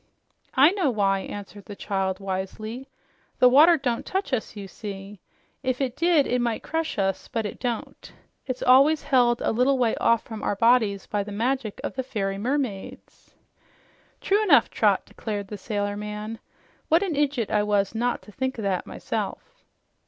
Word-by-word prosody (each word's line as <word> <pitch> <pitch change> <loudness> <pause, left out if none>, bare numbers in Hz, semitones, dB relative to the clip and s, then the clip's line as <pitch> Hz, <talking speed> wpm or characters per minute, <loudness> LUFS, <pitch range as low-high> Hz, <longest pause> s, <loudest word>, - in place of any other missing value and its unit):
"I 280 +5 +7
know 375 -7 +1
why," 200 -4 +1
answered 200 0 -8
the 205 - -8
child 195 -2 -2
wisely. 215 +6 -5 0.5
"The 250 - +6
water 310 +7 +7
don't 245 -5 -2
touch 380 -7 -3
us, 225 -3 -2
you 200 -2 -7
see. 200 0 -8 0.4
If 255 -1 -1
it 260 -3 -1
did, 335 -3 +3
it 250 0 0
might 235 -2 -1
crush 325 -4 -2
us, 195 -1 -1
but 225 -4 -3
it 205 - -6
don't. 240 -3 -5 0.4
It's 255 -1 -3
always 275 +4 +5
held 245 -3 +3
a - - +1
little 255 +4 +2
way 240 -3 +2
off 230 -1 +2
from 220 -2 -8
our - - -1
bodies 220 -3 +3
by 205 -1 -2
the 205 - -9
magic 230 +1 -2
of - - -3
the 260 - -2
fairy 195 -6 -3
mermaids." 245 -4 -4 0.9
"True 405 +2 +2
enough, 425 - +5
Trot," - - +2
declared 205 -3 -5
the 210 - -5
sailor 205 -1 -2
man. 210 +2 -6 0.5
"What 330 +4 +4
an 375 -5 -1
idjut 280 -6 0
I 210 - +3
was 205 -1 +1
not 240 +2 -1
to 210 - -14
think 260 +4 -3
o' 220 - -4
that 190 -2 -1
myself!" - - -5
230 Hz, 175 wpm, -25 LUFS, 205-265 Hz, 0.9 s, I